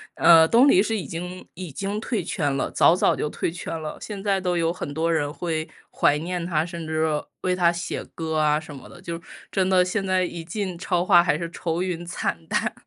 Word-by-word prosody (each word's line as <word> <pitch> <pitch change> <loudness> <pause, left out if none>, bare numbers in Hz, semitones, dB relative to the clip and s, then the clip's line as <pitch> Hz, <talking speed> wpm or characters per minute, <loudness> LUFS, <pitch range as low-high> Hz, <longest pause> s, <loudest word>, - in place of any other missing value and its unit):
呃， 165 -1 +7
东 240 +9 +5
篱 190 -9 +6
是 220 +2 0
已 195 - -4
经 180 +2 -7
已 180 -3 -7
经 195 +8 -3
退 220 -3 -2
圈 150 -4 -1
了， - - -2
早 170 - +5
早 - - +3
就 150 - -2
退 160 - -2
圈 165 -1 -5
了， 155 -1 -6
现 200 -2 -6
在 195 -2 +1
都 180 -1 0
有 165 0 +1
很 160 - -6
多 165 +3 0
人 145 -2 0
会 160 -1 -3 0.2
怀 145 - +3
念 175 +3 -3
他， 160 -3 +1
甚 170 -2 -7
至 160 0 0 0.4
为 180 0 +1
他 175 -2 +4
写 170 0 -4
歌 160 -1 -2
啊， 150 0 +3
什 155 -2 -10
么 135 - -12
的， - - -13
就 170 0 -6 0.3
真 190 -2 +1
的 185 -1 +4
现 195 +3 -1
在 185 0 +2
一 170 -2 -5
进 185 +2 -4
超 175 0 -1
话， 175 -2 +6
还 175 -4 +1
是 170 +1 -4
愁 170 0 -2
云 175 -2 -3
惨 85 - -3
淡。 - - 0
170 Hz, 245 characters per minute, -24 LUFS, 160-185 Hz, 0.4 s, 呃